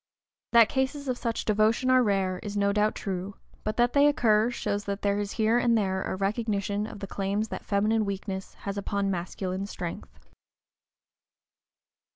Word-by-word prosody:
That 230 -2 +8
cases 275 +2 -2
of 255 - 0
such 230 -2 -2
devotion 220 +4 +2
are 255 0 +6
rare 195 -4 +1
is 205 -1 -5
no 200 0 +2
doubt 210 +1 +2
true, 195 0 -4 0.3
but 215 - -3
that 240 0 +3
they 285 0 +6
occur 225 -5 +3
shows 205 -4 -2
that 200 0 -4
there 200 0 +1
is 205 0 -3
here 225 +2 +2
and 235 -1 +3
there 190 -3 0
a - - -3
recognition 205 0 -1
of 205 - -10
the - - -3
claims 200 +2 -2
that - - -6
feminine 215 +2 +1
weakness 195 -1 -5
has 200 0 -5
upon 200 0 -1
masculine 185 +2 -3
strength. 175 -4 -7
205 Hz, 170 wpm, -27 LUFS, 195-225 Hz, 0.3 s, That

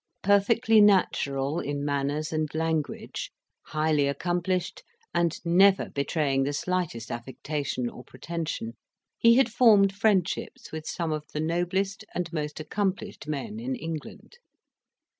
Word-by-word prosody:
Perfectly 215 +3 +4
natural 150 -7 +2
in 145 -2 -3
manners 145 +2 -1
and 155 -1 0
language, 160 -2 -2 0.4
highly 155 -2 +1
accomplished, 175 +5 -1 0.3
and 170 -1 +1
never 190 +3 +4
betraying 140 -1 0
the 140 +2 0
slightest 160 -9 -2
affectation 130 +1 -3
or 125 - -9
pretension, 155 -4 -5 0.5
he 230 0 +6
had 250 -3 +4
formed 210 -5 +5
friendships 195 -3 0
with 155 0 -6
some 170 -3 -2
of 155 -1 -3
the 150 - -2
noblest 180 +5 -1
and 175 -2 -3
most 150 -2 -3
accomplished 190 -2 -3
men 210 +9 -4
in 260 +3 -3
England. 165 - -7
165 Hz, 120 wpm, -27 LUFS, 145-195 Hz, 0.5 s, he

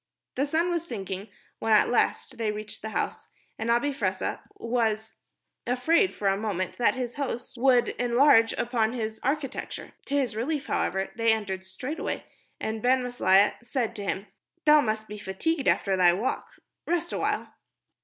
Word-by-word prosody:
The 275 +3 0
sun 330 +4 +1
was 340 -1 -2
sinking 195 - -5 0.3
when 225 - +2
at 210 - +6
last 245 +1 0
they 220 -2 +1
reached 210 0 -7
the 220 - -4
house, - - -3 0.3
and 225 +1 -2
Abi 240 +5 +2
Fressah 190 -7 -1 0.2
was 220 -2 -1 0.5
afraid 320 +10 +3
for 200 - -1
a 195 - +4
moment 195 -2 -3
that 240 - +3
his 250 -1 -4
host 260 -4 -4
would 245 -2 +4
enlarge 240 -1 +5
upon 235 -1 0
its 220 -2 -3
architecture. 275 +1 -3 0.2
To 280 - -1
his 260 -6 +1
relief, 280 +6 -1
however, 190 +1 -1
they 230 -1 +3
entered 195 -4 -2
straightway, 255 - -4 0.3
and 220 0 -3
Ben 255 +2 +3
Maslia 205 -5 +4
said 240 -1 -2
to 205 - -4
him, 195 0 -2 0.4
"Thou 300 0 +7
must 215 -3 -2
be 210 0 -7
fatigued 270 +10 -1
after 195 -1 +3
thy 180 -2 +5
walk. 210 +8 -2 0.4
Rest 345 0 -1
awhile." - - -1
230 Hz, 165 wpm, -27 LUFS, 210-265 Hz, 0.5 s, Thou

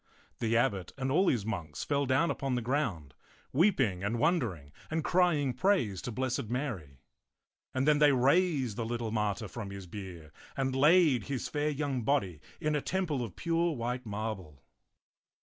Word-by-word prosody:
The 115 0 +1
abbot 100 -8 0
and 130 -1 -1
all 185 +7 +3
his 115 -10 +1
monks 85 -9 -4
fell 140 -1 0
down 135 +6 +3
upon 135 -3 -2
the 125 - -1
ground, 110 - -1 0.4
weeping 135 - +2
and 110 +4 -1
wondering 115 - 0 0.2
and 160 0 -1
crying 155 -8 +2
praise 145 - +1
to 125 - -5
Blessed 130 -2 -2
Mary; 115 - -4 0.7
and 130 +2 0
then 150 -1 +5
they 150 -1 +6
raised 135 - +2
the 115 - -1
little 115 -1 -3
martyr 105 0 -1
from 105 0 -6
his 100 -1 -8
bier 90 -4 -9 0.3
and 135 -1 0
laid 150 - +5
his 135 -3 -3
fair 150 0 -1
young 140 -3 -2
body 100 - 0 0.2
in 155 -2 0
a 145 - 0
temple 165 -8 -1
of 105 -7 -7
pure 170 0 0
white 125 +1 -3
marble. 100 -8 -5
125 Hz, 165 wpm, -31 LUFS, 105-150 Hz, 0.7 s, they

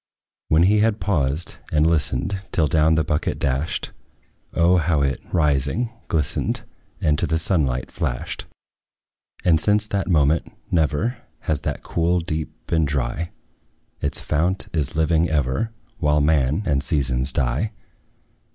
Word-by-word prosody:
When 80 +2 +4
we 105 +4 +4
had 110 0 +2
paused 75 -4 -1
and 75 0 +3
listened, 85 +3 +1
Till 80 - +3
down 80 +1 +3
the 80 - +2
bucket 75 -1 -1
dashed, 70 +3 -1 0.6
O 85 +2 +4
how 80 -3 +2
it, 70 -1 -1
rising, 75 - +1 0.2
glistened, 75 -3 -1 0.4
And 75 0 +2
to 85 - 0
the 80 +2 +1
sunlight 75 -7 +1
flashed! - - -3 1.0
And 80 -3 +4
since 105 0 +3
that 100 -1 -1
moment, 80 -1 +2 0.2
never 85 - +1 0.2
Has 80 -4 0
that - - -3
cool 85 +2 +1
deep 80 -2 -3
been 80 -1 +1
dry; 70 +3 -2 0.7
Its - - 0
fount 85 +5 -1
is 75 -4 -1
living 80 +1 +2
ever, 75 - 0 0.3
While 75 0 +3
man 75 +3 +2
and 70 -2 +1
seasons 65 -2 +2
die. 65 - 0
80 Hz, 135 wpm, -22 LUFS, 70-85 Hz, 1.0 s, When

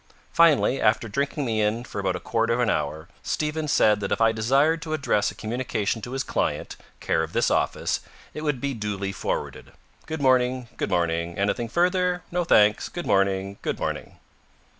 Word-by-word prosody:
Finally, 155 -5 +4
after 110 +1 +2
drinking 140 +5 -2
me 110 -3 0
in 105 +3 0
for 110 - -6
about 95 -2 0
a - - -4
quarter 115 +1 0
of - - -2
an 120 -3 +2
hour, 75 +2 -2
Stevens 150 -1 -2
said 105 -1 +4
that 100 -1 -4
if - - +1
I 115 0 +5
desired 135 +9 +2
to 155 -1 -4
address 105 -9 +1
a - - -10
communication 110 -1 -2
to 120 +4 -7
his 135 0 -1
client, - - -2 0.2
care 80 - 0
of 80 +1 -4
this - - +2
office, - - 0 0.3
it 150 - -6
would 150 -4 -1
be 140 +2 -2
duly 105 -3 -3
forwarded. - - -4 0.3
Good 160 0 -4
morning. 130 -2 +2
Good - - -2
morning. 85 0 0
Anything 110 +4 0
further? 180 - +1
No, 175 0 0
thanks. 105 -9 +4
Good 175 - -6
morning. 100 0 +1
Good - - -2
morning. - - -4
115 Hz, 185 wpm, -25 LUFS, 100-140 Hz, 0.3 s, I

